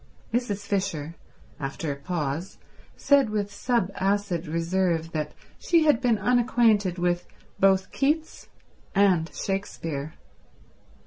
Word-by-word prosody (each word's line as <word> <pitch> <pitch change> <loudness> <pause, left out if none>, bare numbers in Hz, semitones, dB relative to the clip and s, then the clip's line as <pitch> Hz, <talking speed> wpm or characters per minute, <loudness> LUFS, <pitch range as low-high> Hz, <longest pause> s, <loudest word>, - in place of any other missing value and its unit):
Mrs. 205 -5 -1
Fisher, 185 -6 -2 0.5
after 145 +2 -3
a - - -3
pause, 155 +2 -3 0.4
said 280 -5 +4
with 205 -1 -2
sub 205 -2 0
acid 190 -3 -1
reserve 165 0 0
that 150 -2 -3 0.3
she 335 -2 +3
had 295 -6 +4
been 240 -4 +3
unacquainted 225 -4 +3
with 175 0 0 0.3
both 190 -1 +3
Keats 305 +3 -1 0.5
and 185 -5 +3
Shakespeare. 165 -6 -4
195 Hz, 110 wpm, -26 LUFS, 165-220 Hz, 0.5 s, said